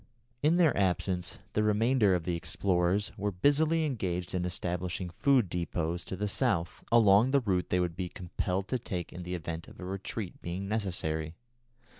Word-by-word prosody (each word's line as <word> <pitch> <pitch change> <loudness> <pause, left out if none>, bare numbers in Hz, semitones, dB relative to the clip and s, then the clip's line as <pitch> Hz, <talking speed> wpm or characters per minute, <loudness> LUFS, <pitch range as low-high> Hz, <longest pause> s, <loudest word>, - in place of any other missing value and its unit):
In 155 +3 +4
their 165 -4 +4
absence 90 -2 0 0.2
the 105 - +2
remainder 105 -1 +3
of 85 - -2
the 85 +1 -1
explorers 90 +3 +1
were 105 0 0
busily 155 - +2
engaged 90 - -2
in 90 -1 0
establishing 90 0 -3
food 130 +3 +3
depôts 85 0 -2
to - - -4
the 105 +3 -2
south, 85 -3 -1
along 110 0 +6
the 140 +1 +4
route 95 -8 0
they 90 - +2
would 90 -2 -1
be 90 -1 -3
compelled 90 +2 -3
to 130 - 0
take 90 -6 -5
in 90 - -7
the 90 +1 -4
event 85 -1 -5
of - - -14
a 90 - -6
retreat 95 +1 -5
being 90 +3 -4
necessary. 85 -7 -2
95 Hz, 175 wpm, -30 LUFS, 90-105 Hz, 0.2 s, along